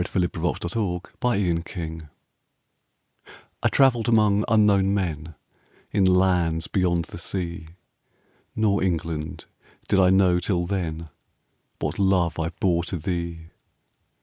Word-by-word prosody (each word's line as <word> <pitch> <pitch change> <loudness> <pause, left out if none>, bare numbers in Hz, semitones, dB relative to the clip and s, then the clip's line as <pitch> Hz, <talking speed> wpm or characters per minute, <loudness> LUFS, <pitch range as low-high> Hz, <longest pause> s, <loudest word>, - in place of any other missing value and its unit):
I - - +1
TRAVELLED 90 -1 -1
AMONG 90 +2 -2
UNKNOWN 95 -9 +1
MEN 80 -2 -6 1.5
I - - +3
travelled 125 -4 +3
among 105 -3 +3
unknown 100 -3 +3
men, 80 -5 -3 0.6
In 100 -2 +2
lands 90 -3 +2
beyond 85 -3 0
the - - -9
sea; 85 -3 -4 0.9
Nor, 105 -2 +1
England! 80 -4 -3 0.4
did 95 - +3
I 90 -1 +5
know 95 -2 +4
till 90 -1 -1
then 85 -4 -3 0.7
What - - -3
love 95 -4 +2
I 80 0 -1
bore 85 -1 0
to 90 - -4
thee. 85 0 -4
90 Hz, 120 wpm, -24 LUFS, 85-100 Hz, 1.5 s, I